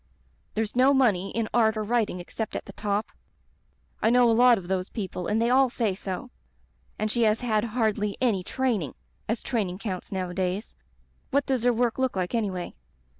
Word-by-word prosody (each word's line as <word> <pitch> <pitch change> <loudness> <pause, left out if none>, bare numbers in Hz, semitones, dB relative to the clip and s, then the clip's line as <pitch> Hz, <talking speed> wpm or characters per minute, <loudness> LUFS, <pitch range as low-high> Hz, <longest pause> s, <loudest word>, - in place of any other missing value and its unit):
There's 220 0 -2
no 265 +3 +5
money 200 -8 +3
in 230 -1 -2
art 220 -2 +3
or 215 - -1
writing 220 -4 0
except 215 +5 -5
at - - -4
the - - -10
top. 205 0 -2 0.9
I 220 - +4
know 245 0 +5
a - - +4
lot 245 +1 +6
of 180 -3 -7
those 185 0 -1
people 185 -5 -4
and 215 - +1
they 235 +1 +2
all 265 0 +5
say 230 -5 0
so. 195 +5 -6 0.7
And 215 0 -1
she 240 - 0
has 220 0 +3
had 220 -4 +1
hardly 215 -3 0
any 220 -8 +1
training 225 - -1 0.2
— - - -38
as 225 +1 -1
training 200 -8 -1
counts 195 -3 -5
nowadays. 185 +1 -2 0.6
)^at 280 +1 +2
does 260 -3 0
her 245 - +6
work 240 +1 0
look 260 -4 +1
like 185 +1 -2
anyway?' 195 -6 -2
220 Hz, 190 wpm, -26 LUFS, 195-240 Hz, 0.9 s, lot